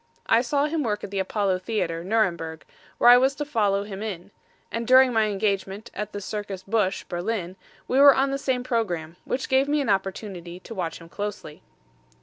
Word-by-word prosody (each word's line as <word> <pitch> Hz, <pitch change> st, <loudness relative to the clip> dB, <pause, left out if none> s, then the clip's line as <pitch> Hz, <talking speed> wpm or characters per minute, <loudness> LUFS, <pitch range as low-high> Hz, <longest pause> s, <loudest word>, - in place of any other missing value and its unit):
I 230 Hz, -, +4 dB
saw 280 Hz, +3 st, +1 dB
him 310 Hz, +1 st, -1 dB
work 210 Hz, -5 st, -2 dB
at -, -, -6 dB
the 200 Hz, -, -2 dB
Apollo 190 Hz, -1 st, 0 dB
Theater, 180 Hz, -5 st, -2 dB
Nuremberg, 170 Hz, -6 st, -1 dB, 0.3 s
where 240 Hz, -, +7 dB
I 245 Hz, -, +9 dB
was 265 Hz, +2 st, +2 dB
to 295 Hz, -, -3 dB
follow 205 Hz, -8 st, +1 dB
him 200 Hz, -1 st, -7 dB
in; 200 Hz, -3 st, -6 dB, 0.4 s
and 230 Hz, 0 st, -3 dB
during 255 Hz, 0 st, +6 dB
my 220 Hz, -1 st, +3 dB
engagement 200 Hz, 0 st, -2 dB
at 210 Hz, +1 st, -5 dB
the 205 Hz, -, -5 dB
Circus 200 Hz, -1 st, -5 dB
Busch, 195 Hz, -1 st, 0 dB
Berlin, 185 Hz, 0 st, -3 dB, 0.3 s
we 260 Hz, -, +2 dB
were 280 Hz, -1 st, +9 dB
on 270 Hz, +1 st, +1 dB
the 275 Hz, -, -2 dB
same 255 Hz, -2 st, -1 dB
programme, 175 Hz, -10 st, -2 dB
which 260 Hz, -, -2 dB
gave 265 Hz, +1 st, +3 dB
me 295 Hz, +1 st, +1 dB
an 275 Hz, -, -1 dB
opportunity 190 Hz, -3 st, -3 dB
to 230 Hz, -, -9 dB
watch 175 Hz, -6 st, -3 dB
him 165 Hz, -, -13 dB
closely. 200 Hz, -5 st, -6 dB
210 Hz, 195 wpm, -25 LUFS, 190-245 Hz, 0.4 s, I